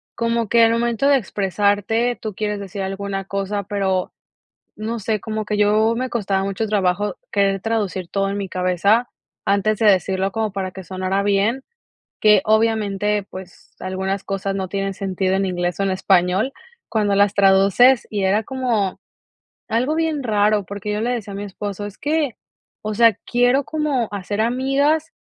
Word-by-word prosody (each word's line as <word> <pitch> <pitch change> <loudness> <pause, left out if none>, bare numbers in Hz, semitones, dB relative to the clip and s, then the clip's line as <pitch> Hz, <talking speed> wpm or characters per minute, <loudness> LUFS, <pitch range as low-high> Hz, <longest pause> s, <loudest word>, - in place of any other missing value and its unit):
Como 230 -2 -1
que 235 -1 +5
al 225 - +5
momento 235 +2 +1
de 285 - +6
expresarte, 205 +3 0
tú 215 -2 -4
quieres 210 0 -2
decir 200 0 -6
alguna 195 0 -3
cosa, 200 +1 -3
pero, 190 -2 -1 0.6
no 225 +2 -4
sé, 215 0 -1
como 215 -1 -4
que 210 0 -2
yo 215 +2 +3
me 255 +2 -2
costaba 195 -5 -1
mucho 200 +3 -2
trabajo 200 -1 0 0.2
querer 195 -1 +1
traducir 200 -5 -2
todo 195 0 0
en 200 - -3
mi 195 -2 -4
cabeza 185 +6 +2 0.4
antes 200 +1 +1
de 225 - +2
decirlo 190 0 +2
como 220 -1 -1
para 190 -1 -4
que 190 +1 -9
sonara 185 +2 -2
bien, 205 +6 +1 0.6
que 210 -2 +5
obviamente, 210 -2 +1
pues, 185 -1 -12
algunas 190 +1 -3
cosas 195 0 -3
no 190 -1 -2
tienen 195 0 -3
sentido 190 -1 -1
en 195 0 +1
inglés 175 -1 -2
o - - +1
en 195 - +1
español 185 +5 +2 0.4
cuando 210 -3 +1
las 200 0 +3
traduces 200 +6 +5
y 205 -2 -1
era 200 +3 +2
como 235 -7 -1 0.7
algo 250 +7 +1
bien 320 -3 -1
raro, 210 -2 +2
porque 205 +1 -5
yo 210 - -1
le 235 +3 0
decía 225 -5 -4
a - - -6
mi 200 - -5
esposo: 205 +1 -5
"Es 205 -1 -9
que, 295 -4 -1 0.5
o 215 0 -3
sea, 230 0 +6
quiero 245 +3 +2
como 290 -6 -1
hacer 205 +1 -3
amigas," 275 +7 +1
205 Hz, 170 wpm, -21 LUFS, 195-230 Hz, 0.7 s, de